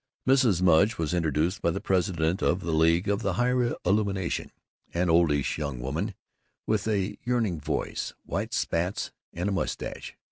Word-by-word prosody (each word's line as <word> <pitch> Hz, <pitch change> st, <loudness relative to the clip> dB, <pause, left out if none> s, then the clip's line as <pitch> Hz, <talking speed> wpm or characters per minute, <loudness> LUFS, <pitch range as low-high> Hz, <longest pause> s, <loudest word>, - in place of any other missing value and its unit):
Mrs. 125 Hz, -9 st, +4 dB
Mudge 90 Hz, +5 st, +4 dB
was 80 Hz, 0 st, -1 dB
introduced 80 Hz, +1 st, 0 dB
by -, -, +2 dB
the 85 Hz, -, -1 dB
president 90 Hz, -3 st, 0 dB
of 90 Hz, -, +2 dB
the 85 Hz, -, -2 dB
League 80 Hz, +3 st, +3 dB
of 100 Hz, +2 st, +1 dB
the 100 Hz, -3 st, 0 dB
Higher 125 Hz, +3 st, +1 dB
Illumination, 100 Hz, -1 st, 0 dB, 0.4 s
an 85 Hz, 0 st, +2 dB
oldish 80 Hz, -4 st, +2 dB
young 70 Hz, -5 st, -3 dB
woman 70 Hz, +6 st, -3 dB, 0.5 s
with 110 Hz, -1 st, 0 dB
a 100 Hz, -2 st, -1 dB
yearning 115 Hz, -9 st, 0 dB
voice, -, -, -2 dB
white -, -, -3 dB
spats, 90 Hz, +4 st, -1 dB, 0.2 s
and 90 Hz, +3 st, -3 dB
a -, -, 0 dB
mustache. 95 Hz, -, -3 dB
90 Hz, 155 wpm, -27 LUFS, 80-100 Hz, 0.5 s, Mrs